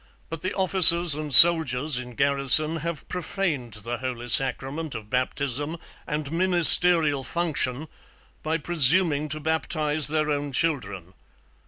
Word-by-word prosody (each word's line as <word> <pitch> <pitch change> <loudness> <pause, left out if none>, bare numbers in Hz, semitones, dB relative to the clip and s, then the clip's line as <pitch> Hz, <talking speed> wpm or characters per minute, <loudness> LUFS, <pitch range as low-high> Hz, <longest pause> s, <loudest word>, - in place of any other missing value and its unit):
But 165 -1 -11
the 185 - -7
Officers 175 -3 +4
and 150 0 -8
Soldiers 150 -3 +5
in 125 -1 -14
Garrison 140 +4 0
have 165 -1 -10
Prophaned 170 - -8
the 120 +1 -9
Holy 125 -2 -10
Sacrament 135 +4 -3
of 110 -1 -14
Baptism 140 +4 -6 0.3
and 150 0 -8
Ministeriall 170 -4 +3
Function, 155 -3 -6 0.5
by 160 +1 -6
presuming 155 -1 -1
to 155 +2 -2
Baptize 155 -1 +2
their 155 0 -5
own 145 -1 -8
children. 100 - -6
150 Hz, 125 wpm, -19 LUFS, 130-165 Hz, 0.5 s, Soldiers